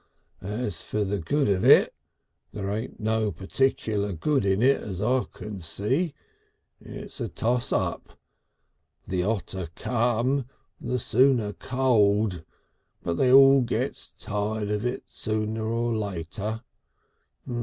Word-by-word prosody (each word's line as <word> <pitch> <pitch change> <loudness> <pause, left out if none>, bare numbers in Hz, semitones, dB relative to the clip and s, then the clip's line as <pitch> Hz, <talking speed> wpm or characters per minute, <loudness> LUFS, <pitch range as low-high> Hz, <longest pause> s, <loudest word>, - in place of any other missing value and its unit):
As 105 +2 -4
for 105 - -2
the 100 +1 -1
good 140 - +1
of 95 -2 +1
it, - - +6 0.6
there 100 -1 -3
ain't 110 +4 -4
no 110 -1 0
particular 100 - -1
good 135 - 0
in 95 +3 +2
it 135 +2 +4
as 95 -3 -6
I 125 +5 +1
can 105 -2 -8
see. 125 - -1 0.7
It's - - -9
a - - -1
toss 120 +2 0
up. - - -2 0.9
The 90 -1 -1
hotter 95 -3 -2
come, 120 +3 0 0.3
the 125 +1 -2
sooner 120 -3 +2
cold, 105 -9 +1 0.6
but 85 - -1
they 125 - +3
all 135 0 +8
gets 120 - -2
tired 105 +1 -2
of 105 0 -1
it 125 - -2
sooner 110 0 -3
or 115 +1 0
later.... 105 +3 -4
110 Hz, 125 wpm, -26 LUFS, 100-125 Hz, 0.9 s, all